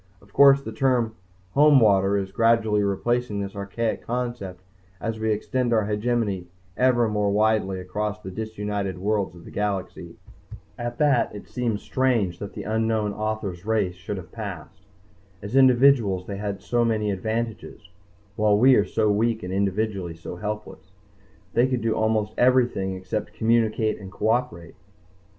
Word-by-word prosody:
Of 100 0 -23
course, 140 0 +6
the 110 - -6
term 120 -1 +1 0.4
"Homewater" 105 -9 +5
is 95 -1 -5
gradually 110 0 +2
replacing 105 +2 -1
this 100 0 -5
archaic 100 +3 -3
concept 120 -7 -4 0.4
as 115 -1 -4
we 110 0 0
extend 120 +3 -1
our 110 -2 +2
hegemony 105 -3 -1 0.3
ever 120 -1 +3
more 105 -1 0
widely 105 -2 +1
across 105 +3 -3
the 95 -3 -8
disunited 105 -2 -4
worlds 100 -1 -1
of 85 - -14
the - - -11
galaxy._ 100 -2 -3 0.7
_At 120 0 -4
that 145 -8 +2
it 105 - -9
seems 115 -4 -2
strange 115 -10 0
that 100 0 -7
the - - -6
unknown 110 -1 0
author's 105 -4 -4
race 105 -4 0
should 95 +3 -6
have 90 -2 -9
passed. 100 -9 -8 0.6
As 100 +5 -5
individuals 125 -7 +4
they 100 0 -5
had 100 -1 -4
so 120 +3 +1
many 110 -3 0
advantages, 110 +3 -4 0.5
while 105 -1 +3
we 130 +5 +6
are 105 -4 +4
so 110 -2 +1
weak 110 +2 0
and 90 +1 -5
individually 100 -2 -1
so 85 +1 -8
helpless. 105 +2 -6 0.6
They 120 +2 +3
could 130 -2 -1
do 115 0 +1
almost 110 -1 0
everything 120 -7 +2
except 95 +3 -4
communicate 110 -1 +1
and 95 -2 -10
cooperate. 110 -3 -1
105 Hz, 150 wpm, -24 LUFS, 100-115 Hz, 0.7 s, course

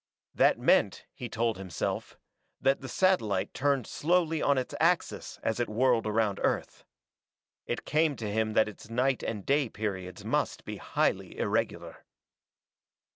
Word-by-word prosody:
That - - +4
meant, - - +2
he 120 - -7
told 115 -2 -1
himself, 95 -4 -4 0.4
that 135 +1 +2
the 130 - -7
satellite 120 - +1
turned 140 -3 +1
slowly 165 0 +1
on 140 - +3
its 130 - -2
axis - - 0
as 110 +1 -1
it 120 - 0
whirled 120 +1 +2
around 110 -2 +1
Earth. - - -1 0.8
It 120 - -3
came 155 -1 +2
to 110 -4 -4
him 110 +1 0
that 110 - +4
its 105 +1 -10
night 125 +3 +1
and 105 -4 -4
day 140 -2 +2
periods 95 -4 -5
must - - -1
be - - -5
highly - - -1
irregular. - - -2
120 Hz, 145 wpm, -29 LUFS, 105-140 Hz, 0.8 s, That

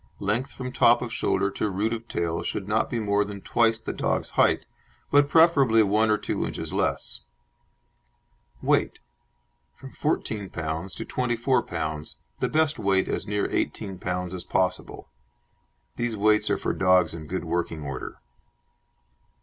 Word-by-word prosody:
Length 110 +7 -1
from 125 -1 -6
top 120 -1 +4
of 120 -1 -5
shoulder 100 - +1
to 105 - -1
root 105 +4 -1
of 115 0 -6
tail 85 -4 -2
should 100 - -3
not 110 +2 +1
be 120 - -2
more 105 -1 +2
than 100 -1 -7
twice 115 +2 +2
the 110 - -5
dog's - - -1
height, - - +3 0.5
but, 145 0 +5
preferably, 140 -9 +5
one 105 +2 +2
or 105 - +4
two - - -2
inches - - -4
less. - - -1 1.4
WEIGHT - - +2 0.8
From 135 - -11
14 110 -9 -2
lb. 80 +3 -4
to - - -5
24 125 +1 0
lb. 75 -2 -4 0.2
the - - 0
best 155 -1 +1
weight 95 -2 +2
as - - -2
near 105 -1 0
18 95 -2 -2
lb. 90 -1 -3
as 90 - -4
possible. 90 -1 -1 0.9
These 120 -2 -1
weights 105 +1 +3
are - - +2
for - - -2
dogs 90 -2 +3
in 80 -2 -8
good 95 +1 -3
working 80 -2 -2
order. 70 -3 -6
105 Hz, 155 wpm, -26 LUFS, 90-115 Hz, 1.4 s, but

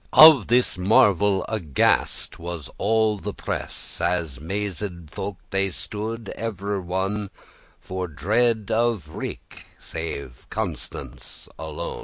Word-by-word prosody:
* - - -36 0.2
Of 130 -10 -3
this 120 -5 +2
marvel 100 0 +4
aghast 85 -11 +1
was 85 -4 -6
all 110 -1 +2
the - - -5
press, - - -4
As 85 -7 0
mazed 95 -2 -4
folk 100 -1 -4
they 95 0 +2
stood 110 +4 -5
every 100 -2 -2
one 95 +3 -2 0.5
For 95 0 -4
dread 110 - +1
of 115 -7 +1
wreake,* - - -7
save 70 -6 -6
Constance - - -5
alone. 80 -2 -4
95 Hz, 115 wpm, -24 LUFS, 85-110 Hz, 0.5 s, marvel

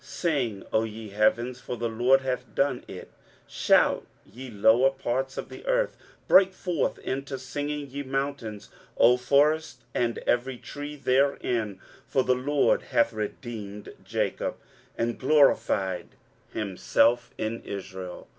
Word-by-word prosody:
23:044:023 - - -17
Sing, 140 - -1
O 110 - +3
ye 110 -1 -7
heavens; 115 +4 +1
for 125 - -6
the 115 +1 -1
LORD 120 +4 +3
hath 130 -1 -4
done 140 -3 +1
it: 90 - -9 0.3
shout, - - +3 0.2
ye 125 +6 -10
lower 115 +4 +4
parts 135 0 -3
of - - -5
the - - -10
earth: - - +1 0.3
break 190 -1 +6
forth 175 -6 -1
into 135 +1 -4
singing, 145 +3 -4
ye 140 +2 -5
mountains, 135 -6 -4 0.3
O 120 +2 +6
forest, 140 0 +2
and 120 -1 0
every 125 +1 +1
tree 145 +4 -7
therein: 125 -7 0 0.3
for 130 - +2
the 130 - +3
LORD 140 +3 +2
hath 115 - +1
redeemed 105 -1 -6
Jacob, - - -2 0.4
and 115 0 -1
glorified 105 - +3 0.4
himself 115 +4 +1
in 110 +1 -3
Israel. 95 -2 -7
125 Hz, 135 wpm, -27 LUFS, 110-140 Hz, 0.4 s, break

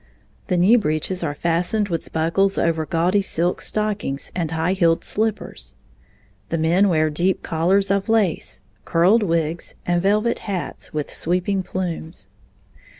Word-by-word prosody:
The 180 - +1
knee 195 +8 +5
breeches 180 -1 -1
are 145 -4 -2
fastened 175 +6 0
with 165 -2 -4
buckles 180 +5 +1
over 160 -2 0
gaudy 180 +5 +2
silk 175 -2 0
stockings 210 -10 -1
and 170 -3 -1
high 160 +3 0
heeled 170 -3 +2
slippers. 220 0 -2 0.7
The 165 - -1
men 175 +5 +3
wear 155 -2 +2
deep 175 +5 0
collars 190 +4 +1
of 200 +2 0
lace, 215 -7 0 0.2
curled 180 +7 +3
wigs, 165 -3 -1
and 175 0 +1
velvet 210 +5 +1
hats 195 -4 -5
with 150 -1 -4
sweeping 180 +3 0
plumes. 180 -2 -5
175 Hz, 140 wpm, -22 LUFS, 165-195 Hz, 0.7 s, knee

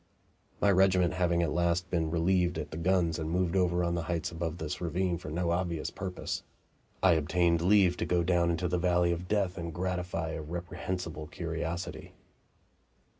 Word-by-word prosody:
My 100 - +4
regiment 95 -2 +4
having 85 -1 +2
at 80 - 0
last 85 +2 0
been 80 -3 +1
relieved 90 +1 +1
at 75 -2 -5
the 80 - -5
guns 85 -1 +1
and 80 0 -3
moved 90 +1 0
over 90 -1 +2
to 85 - 0
the 85 0 -1
heights 85 0 -2
above 85 -1 -3
this 80 -2 -4
ravine 85 +1 -1
for 85 - -7
no 85 +2 -1
obvious 85 -3 -1
purpose, 95 -2 -4 0.6
I 95 - +7
obtained 85 +2 +2
leave 95 -1 +4
to - - -1
go 90 -1 +2
down 85 0 +2
into 85 +1 0
the 90 0 0
valley 90 -1 +3
of 85 +1 -3
death 95 -3 0
and 85 0 -4
gratify 90 -1 -2
a 80 - -4
reprehensible 85 -1 -5
curiosity. 85 0 -5
85 Hz, 175 wpm, -30 LUFS, 85-90 Hz, 0.6 s, I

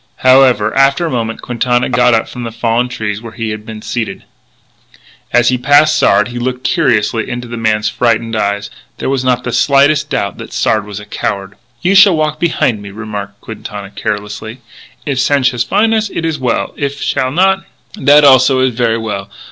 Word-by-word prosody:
However, 130 -5 +4
after 135 +4 +3
a 165 - -2
moment, 115 -2 -3
Quintana 120 0 0
got 125 -1 +3
up 110 - 0
from 125 - -8
the 115 -1 -5
fallen 115 +2 0
tree 105 -4 -3
where 115 0 -10
he 115 -2 -4
had 110 0 -7
been 110 -1 -8
seated. 115 -3 -4 1.1
As 120 0 +3
he 125 -1 0
passed 145 +4 +4
Sard 105 +3 +3
he 120 0 -6
looked 125 +1 -3
curiously 115 - +1
into 120 0 -5
the 120 - -6
man's 110 -2 0
frightened 115 -1 0
eyes. 100 -1 -2 0.3
There - - -2
was 135 -2 -1
not 125 -1 +1
the 125 - -4
slightest 145 +2 +3
doubt 125 -8 -2
that - - -9
Sard 110 -2 0
was 105 -1 -7
a 105 - -11
coward. 100 -1 -4 0.3
"You 185 - +2
shall 190 -3 +6
walk 155 0 -1
behin' 130 -10 0
me," 100 - -9
remarked 100 -1 -7
Quintana 105 -2 -8
carelessly. 105 +4 -5 0.4
"If 140 -3 -1
Sanchez 130 -3 +2
fin' 220 - +2
us, 220 -1 0
it 165 - -4
is 160 -3 -2
well; 125 -3 -1
if 140 0 -3
he - - -5
shall 130 -2 0
not, 190 +6 +2 0.3
that 150 -7 +4
also 130 -1 +5
is 130 -1 +1
ver' 115 -1 0
well.... 105 -3 -5
120 Hz, 195 wpm, -14 LUFS, 110-135 Hz, 1.1 s, shall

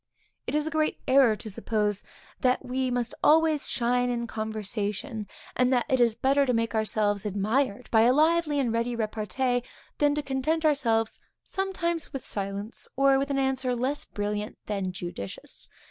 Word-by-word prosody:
It - - -1
is 300 0 +1
a 315 - -3
great 310 0 +1
error 260 -4 +5
to 220 - -10
suppose 210 0 -1 0.4
that 255 0 +1
we 255 +1 -1
must 245 -1 -1
always 315 -1 +4
shine 245 +1 +1
in 235 -1 -1
conversation, 215 +1 -4 0.3
and 250 0 +3
that 245 -2 +2
it 260 - +2
is 235 -2 +4
better 275 +4 +3
to 250 -3 +1
make 230 -1 0
ourselves 210 -2 0
admired 215 +4 0
by 220 - +5
a 235 +2 +6
lively 310 +1 +3
and 245 -4 +1
ready 235 +1 0
repartee, 230 +3 -1 0.4
than 290 -1 +3
to 300 - -1
content 300 +4 0
ourselves 230 -7 +2 0.2
sometimes 345 -4 -2
with 270 - -6
silence, 200 +2 -3
or 275 0 +4
with 275 +1 -1
an 280 - 0
answer 265 -2 +1
less 260 +4 -1
brilliant 210 0 -3
than 195 -3 -2
judicious. 175 - -6
245 Hz, 165 wpm, -27 LUFS, 215-275 Hz, 0.4 s, a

